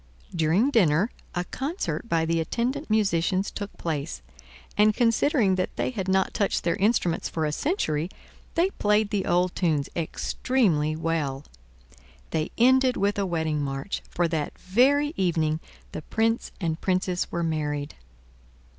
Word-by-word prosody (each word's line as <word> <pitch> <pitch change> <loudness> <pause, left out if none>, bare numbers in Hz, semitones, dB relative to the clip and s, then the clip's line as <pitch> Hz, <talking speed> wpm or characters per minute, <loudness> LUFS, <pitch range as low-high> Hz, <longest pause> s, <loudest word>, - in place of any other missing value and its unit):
During 175 - +3
dinner 190 - +3 0.2
a 175 - 0
concert 270 - -4
by 165 -1 +2
the 165 0 +1
attendant 245 - -2
musicians 195 -2 +1
took 205 -1 -5
place, 145 - -3 0.5
and, 210 0 +4
considering 230 -2 +3 0.2
they - - -1
had 195 -6 -4
not 190 0 +2
touched 200 - 0
their 170 - +1
instruments 200 -4 +1
for 160 -1 -1
a 150 - 0
century, 165 - -1 0.5
they 355 +3 +2
played 210 - +1
the 200 -2 -1
old 180 +1 +2
tunes 155 -6 0
extremely 165 - 0
well. 155 -4 -2 0.9
They 155 -1 -1
ended 260 +1 +4
with 200 +1 +1
a 195 - 0
wedding 160 -3 -1
march, 135 +6 -3
for 175 -1 +1
that 155 -3 -2
very 280 +10 +3
evening 160 -4 +1 0.3
the - - -5
Prince 225 +7 0
and 165 -3 -2
Princess 185 -1 0
were 170 - -1
married. 150 -3 -2
180 Hz, 140 wpm, -26 LUFS, 160-220 Hz, 0.9 s, and